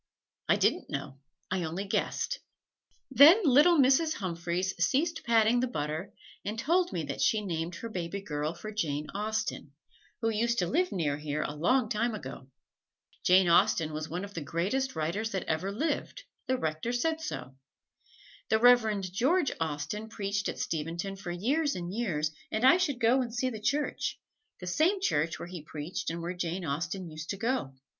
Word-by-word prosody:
"I -, -, +6 dB
didn't -, -, +1 dB
know 135 Hz, 0 st, -5 dB, 0.3 s
I 190 Hz, -1 st, 0 dB
only 170 Hz, +4 st, -3 dB
guessed." 485 Hz, -, -1 dB, 0.7 s
Then 290 Hz, -, +9 dB
little 300 Hz, +5 st, +6 dB
Mrs. 285 Hz, +4 st, +4 dB
Humphreys 180 Hz, 0 st, -2 dB
ceased 325 Hz, +5 st, +1 dB
patting 230 Hz, 0 st, +4 dB
the 255 Hz, -, +1 dB
butter 155 Hz, -2 st, -3 dB, 0.3 s
and 210 Hz, +2 st, -4 dB
told 350 Hz, +8 st, +2 dB
me 165 Hz, -, -2 dB
that 140 Hz, -2 st, -4 dB
she 220 Hz, -, +3 dB
named 170 Hz, -1 st, -3 dB
her 230 Hz, -, -6 dB
baby 185 Hz, -2 st, -4 dB
girl 155 Hz, -4 st, -3 dB
for 215 Hz, +5 st, -7 dB
Jane 150 Hz, -8 st, -2 dB
Austen, 215 Hz, -7 st, -3 dB, 0.5 s
who 225 Hz, -, +1 dB
used 235 Hz, +2 st, 0 dB
to 180 Hz, -, +2 dB
live 350 Hz, -, +1 dB
near 150 Hz, -6 st, 0 dB
here 150 Hz, 0 st, -2 dB
a -, -, -4 dB
long 220 Hz, -, +2 dB
time 220 Hz, +2 st, 0 dB
ago. 130 Hz, -6 st, -8 dB, 0.8 s
Jane 185 Hz, 0 st, +5 dB
Austen 165 Hz, -2 st, +3 dB
was 155 Hz, +1 st, -4 dB
one 180 Hz, +4 st, -3 dB
of 200 Hz, -, -12 dB
the 170 Hz, -, -4 dB
greatest 195 Hz, -, -1 dB
writers 170 Hz, +8 st, -1 dB
that 190 Hz, -, -1 dB
ever 165 Hz, +5 st, -1 dB
lived 305 Hz, -, -2 dB, 0.2 s
the 260 Hz, 0 st, +1 dB
Rector 160 Hz, +6 st, -2 dB
said 320 Hz, +6 st, 0 dB
so. 135 Hz, -, -6 dB, 0.9 s
The 220 Hz, -, +4 dB
Reverend 220 Hz, -6 st, +4 dB
George 280 Hz, -, +2 dB
Austen 160 Hz, +8 st, -3 dB
preached 205 Hz, -2 st, -2 dB
at -, -, -5 dB
Steventon 170 Hz, +5 st, -3 dB
for 195 Hz, -2 st, -8 dB
years 275 Hz, -, 0 dB
and 175 Hz, 0 st, -5 dB
years, 165 Hz, -10 st, -1 dB, 0.2 s
and 220 Hz, +3 st, +1 dB
I 325 Hz, +7 st, +8 dB
should 295 Hz, -9 st, 0 dB
go 245 Hz, +3 st, +4 dB
and 240 Hz, -2 st, -3 dB
see 255 Hz, +2 st, -1 dB
the 220 Hz, -3 st, -7 dB
church 285 Hz, +7 st, -1 dB, 0.4 s
the 180 Hz, -, -7 dB
same 320 Hz, -, +2 dB
church 165 Hz, -, 0 dB
where -, -, -7 dB
he 175 Hz, -2 st, -7 dB
preached 155 Hz, +4 st, -5 dB
and 165 Hz, 0 st, -4 dB
where 175 Hz, +2 st, -3 dB
Jane 175 Hz, 0 st, -3 dB
Austen 170 Hz, +5 st, -3 dB
used 155 Hz, 0 st, -8 dB
to 200 Hz, -, -2 dB
go. 225 Hz, -, -1 dB
195 Hz, 180 wpm, -30 LUFS, 165-245 Hz, 0.9 s, Then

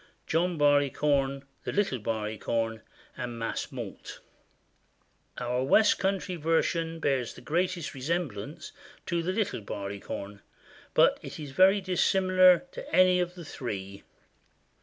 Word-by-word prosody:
John 170 Hz, +1 st, 0 dB
Barleycorn, 145 Hz, -1 st, +2 dB, 0.2 s
The -, -, -3 dB
Little 200 Hz, -11 st, 0 dB
Barleycorn, 110 Hz, +1 st, -2 dB, 0.3 s
and 120 Hz, -1 st, -5 dB
Mas 115 Hz, 0 st, -3 dB
Mault. -, -, -8 dB, 1.2 s
Our 125 Hz, +1 st, -1 dB
west 210 Hz, +10 st, +4 dB
country 190 Hz, -2 st, -1 dB
version 165 Hz, +1 st, 0 dB
bears 135 Hz, -6 st, 0 dB
the -, -, -12 dB
greatest 175 Hz, +1 st, -1 dB
resemblance 140 Hz, -, -4 dB, 0.3 s
to 170 Hz, -1 st, -1 dB
The 175 Hz, +3 st, -1 dB
Little 200 Hz, -, -1 dB
Barleycorn, 100 Hz, 0 st, -6 dB, 0.5 s
but -, -, +5 dB
it -, -, -8 dB
is 145 Hz, -3 st, -7 dB
very 190 Hz, +7 st, +5 dB
dissimilar 185 Hz, +1 st, +4 dB
to -, -, -9 dB
any 185 Hz, 0 st, +6 dB
of 180 Hz, 0 st, -2 dB
the 175 Hz, -2 st, -9 dB
three. 100 Hz, -8 st, -6 dB
150 Hz, 120 wpm, -28 LUFS, 120-180 Hz, 1.2 s, any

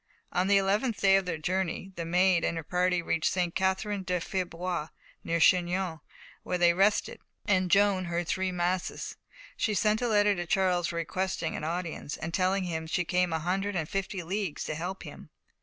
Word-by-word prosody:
On 180 Hz, +1 st, +1 dB
the 200 Hz, 0 st, +5 dB
eleventh 205 Hz, +4 st, +1 dB
day 195 Hz, -1 st, +5 dB
of 195 Hz, -1 st, +1 dB
their 165 Hz, -3 st, -2 dB
journey 185 Hz, +3 st, -2 dB
the 170 Hz, -, -4 dB
Maid 180 Hz, 0 st, +3 dB
and 170 Hz, -, 0 dB
her 165 Hz, -, -4 dB
party 180 Hz, +1 st, +1 dB
reached 165 Hz, -1 st, +1 dB
St. 180 Hz, -2 st, 0 dB
Catherine 190 Hz, +2 st, 0 dB
de 180 Hz, -1 st, -1 dB
Fierbois, 175 Hz, -2 st, -3 dB, 0.4 s
near 170 Hz, 0 st, 0 dB
Chinon, 180 Hz, -1 st, +2 dB, 0.4 s
where 180 Hz, -, -2 dB
they 175 Hz, -1 st, +5 dB
rested, 195 Hz, +4 st, +2 dB, 0.3 s
and 185 Hz, -2 st, +2 dB
Joan 195 Hz, -1 st, +4 dB
heard 170 Hz, 0 st, -2 dB
three 190 Hz, +2 st, 0 dB
masses. 180 Hz, 0 st, -2 dB, 0.4 s
She 215 Hz, -3 st, 0 dB
sent 215 Hz, +3 st, +2 dB
a 245 Hz, -, +1 dB
letter 205 Hz, -2 st, +4 dB
to 175 Hz, -2 st, -4 dB
Charles 180 Hz, -1 st, +1 dB
requesting 170 Hz, +1 st, -2 dB
an -, -, -5 dB
audience, 165 Hz, -2 st, -4 dB
and 165 Hz, +1 st, -5 dB
telling 190 Hz, +1 st, +1 dB
him 160 Hz, -3 st, -3 dB
she 165 Hz, -, 0 dB
had 175 Hz, -, -5 dB
come 180 Hz, -1 st, +2 dB
a 160 Hz, -, +1 dB
hundred 190 Hz, +5 st, -1 dB
and 160 Hz, -4 st, -1 dB
fifty 195 Hz, 0 st, -3 dB
leagues 190 Hz, -1 st, -3 dB
to -, -, -3 dB
help 180 Hz, +5 st, -5 dB
him. -, -, -11 dB
180 Hz, 190 wpm, -29 LUFS, 170-195 Hz, 0.4 s, the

